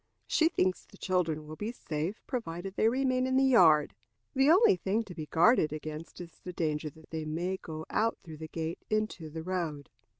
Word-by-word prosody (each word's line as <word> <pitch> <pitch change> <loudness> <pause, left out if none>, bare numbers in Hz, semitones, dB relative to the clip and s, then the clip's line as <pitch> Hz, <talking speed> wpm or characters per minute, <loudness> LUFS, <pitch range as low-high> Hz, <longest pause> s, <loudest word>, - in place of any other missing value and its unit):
She 320 0 +3
thinks 185 - 0
the - - -18
children 165 -5 0
will 155 +1 -8
be 210 +7 -4
safe, 165 -2 -4
provided 195 -7 -4
they 220 - +4
remain 255 0 +1
in 260 0 +2
the 270 - +4
yard. 170 - +5 0.4
The 270 +1 +4
only 360 - +6
thing 195 +5 -1
to 195 - -10
be 155 -2 -6
guarded 165 - +4
against 155 +1 -7
is 175 -1 -10
the 180 - -6
danger 155 -2 -1
that 160 +2 -18
they 160 -1 -3
may 170 +5 -2
go 160 -3 -7
out 225 +2 0
through 160 -3 -9
the 160 +1 -7
gate 160 +1 -4
into 215 -7 -1
the 160 +1 -6
road. 165 -6 -3
175 Hz, 200 wpm, -30 LUFS, 155-220 Hz, 0.4 s, only